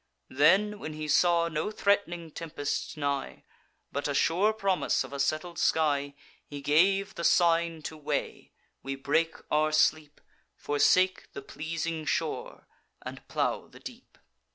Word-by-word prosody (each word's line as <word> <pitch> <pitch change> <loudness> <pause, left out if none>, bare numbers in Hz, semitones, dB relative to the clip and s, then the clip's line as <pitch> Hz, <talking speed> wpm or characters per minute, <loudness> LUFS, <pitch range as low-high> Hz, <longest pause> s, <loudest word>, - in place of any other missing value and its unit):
Then, 195 +9 +3
when 155 - -6
he 155 0 -5
saw 170 +2 +3
no 155 +4 -2
threat'ning 185 -6 0
tempest 155 -2 -4
nigh, 140 -2 -3 0.5
But 140 - -2
a 145 - -2
sure 180 +9 +3
promise 195 -4 0
of - - -10
a 140 - -5
settled 155 +5 -1
sky, 145 -3 +1 0.3
He 145 - -7
gave 190 +8 +2
the 170 - -6
sign 170 -2 +2
to 160 - -6
weigh; 150 - -4 0.3
we 135 0 -4
break 155 +4 0 0.2
our 155 +1 +2
sleep, 155 -1 +1 0.4
Forsake 185 +6 +2
the 140 - -7
pleasing 160 +2 -4
shore, 160 -1 -3 0.4
and - - -9
plow - - -1
the - - -16
deep. - - -12
160 Hz, 140 wpm, -28 LUFS, 145-175 Hz, 0.5 s, Then